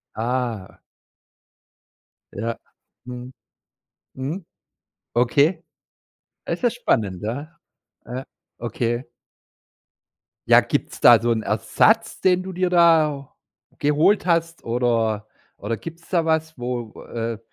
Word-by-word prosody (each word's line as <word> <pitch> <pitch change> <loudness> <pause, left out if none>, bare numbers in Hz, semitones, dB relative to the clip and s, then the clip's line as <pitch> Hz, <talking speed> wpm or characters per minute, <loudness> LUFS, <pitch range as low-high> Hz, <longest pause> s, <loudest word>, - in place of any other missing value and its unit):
Ah. 115 -3 -3 1.5
Ja. 115 +3 -3 0.5
Mhm. 125 0 -8 0.9
Mhm. 155 +8 -4 0.7
Okay. 145 +8 +3 0.8
Das - - -3
ist 240 - +3
spannend. 100 - 0
Ja. 145 +9 -5 0.5
Ja. 130 +2 -5 0.4
Okay. 120 +1 -2 1.4
Ja, - - +8
gibt's - - -3
da 120 -3 +8
so 120 +1 0
'n 110 -1 +1
Ersatz, - - +2
den 185 -1 +3
du 190 0 -6
dir 180 0 0
da 160 -5 +3 0.4
geholt 150 +7 +3
hast 165 -1 0
oder 115 -3 0 0.3
oder 110 +3 -3
gibt's 165 +9 -10
da 170 -3 +2
was, 160 0 0
wo 120 -2 -5
äh, 115 -1 -4
130 Hz, 105 wpm, -23 LUFS, 115-165 Hz, 1.5 s, Ja